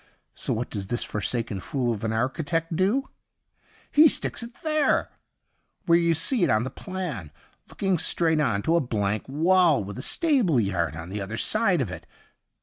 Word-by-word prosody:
So - - -2
what 115 +2 -2
does 100 -3 -4
this 120 +3 -1
forsaken 110 0 -2
fool 120 +3 -1
of 105 - -7
an 110 - -1
architect 160 +8 -1
do? 205 +10 +1 0.8
He 310 +2 +7
sticks - - +1
it 235 +1 -11
there, 310 -2 +1 0.7
where 170 -1 +5
you 170 -1 +2
see 185 - 0
it - - +2
on 110 +1 +2
the 130 - -5
plan, 175 - -6 0.4
looking 190 -4 -1
straight 160 -1 +2
on 110 -9 0
to 165 - +2
a - - +4
blank 110 -3 -2
wall 165 - +3
with 100 +1 -7
a - - -4
stable 260 - +2
yard 90 -7 -1
on 80 +1 -8
the 105 +1 -4
other 105 +3 -5
side 205 - +2
of 110 -8 -3
it. - - -9
140 Hz, 180 wpm, -25 LUFS, -, 0.8 s, He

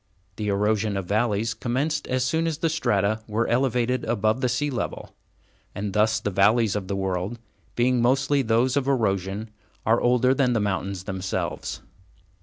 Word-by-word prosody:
The 105 - -3
erosion 105 +1 +1
of 95 - -3
valleys 110 +2 0
commenced 135 +7 -2
as 130 0 0
soon 160 +5 0
as 160 -3 -2
the 165 +1 0
strata 110 -8 +1
were 110 +2 0
elevated 125 0 +1
above 110 +2 +1
the 125 - +1
sea 145 +4 0
level, 125 - -4 0.6
and 100 -1 -3
thus 110 +1 +2
the 105 - -2
valleys 105 +3 +3
of 100 -3 -3
the 100 - -2
world, 95 +3 -2 0.4
being 125 0 +2
mostly 135 +3 +2
those 120 +2 +2
of 140 -2 0
erosion, 105 -4 0 0.3
are 115 +2 +3
older 125 +1 +3
than 130 -2 +2
the 115 - +1
mountains 100 -2 -2
themselves. 95 -1 -4
115 Hz, 165 wpm, -25 LUFS, 100-125 Hz, 0.6 s, valleys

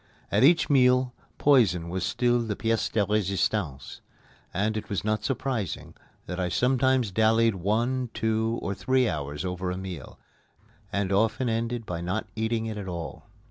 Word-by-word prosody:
At - - +3
each 165 +4 +5
meal, 125 -2 +4 0.2
poison 110 - +4
was 90 +1 -3
still 120 +6 +2
the 110 -3 -2
pièce 115 +1 0
de 105 -2 +2
résistance, 95 -8 -1 0.5
and 105 +4 0
it 110 - -5
was 100 - -2
not 110 0 0
surprising 130 -6 -3 0.3
that 90 +1 -5
I 90 -1 0
sometimes 130 0 +2
dallied 110 +2 +3
one, 115 +7 0
two, 110 +1 0
or 100 - -1
three 125 +7 +1
hours 75 -1 -3
over 90 0 -3
a 90 - -3
meal, 90 -7 -7 0.7
and 100 0 -1
often 110 +5 +2
ended 115 +1 -2
by 85 -3 -4
not 90 +5 -2
eating 110 0 -1
it 110 -2 -4
at 100 - -6
all. 85 +3 -6
110 Hz, 160 wpm, -27 LUFS, 95-120 Hz, 0.7 s, each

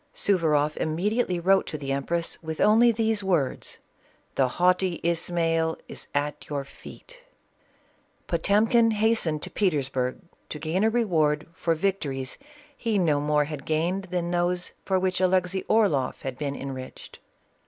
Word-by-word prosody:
Suvaroff 155 -6 +2
immediately 180 +4 0
wrote 190 +3 +3
to 155 - -4
the 140 -2 -4
empress 165 +5 -2
with 160 -1 -6
only 230 +3 +5
these 220 -2 0
words: 170 -9 -1 0.3
" - - -36
The 130 - +2
haughty 180 +4 +1
Ismail 165 -1 0
is - - -10
at 145 +1 -2
your 145 -2 -2
feet/' - - -13 1.1
Potemkin 225 +3 +3
hastened 210 -9 +1
to - - -5
Petersburg 135 -9 0 0.3
to - - -5
gain 160 +6 -1
a 220 - +4
reward 160 -10 +1
for 165 0 0
victories 150 -8 -2 0.4
he 225 -3 -1
no 160 -6 +2
more 150 0 +2
had 150 -2 -6
gained 170 +6 -1
than 175 -1 -2
those 175 0 0
for 190 - +2
which 185 0 0
Alexey 185 0 +2
Orloflf 195 -12 +2
had 130 -1 -4
been 140 0 -3
enriched. 130 -2 -8
170 Hz, 145 wpm, -26 LUFS, 150-195 Hz, 1.1 s, only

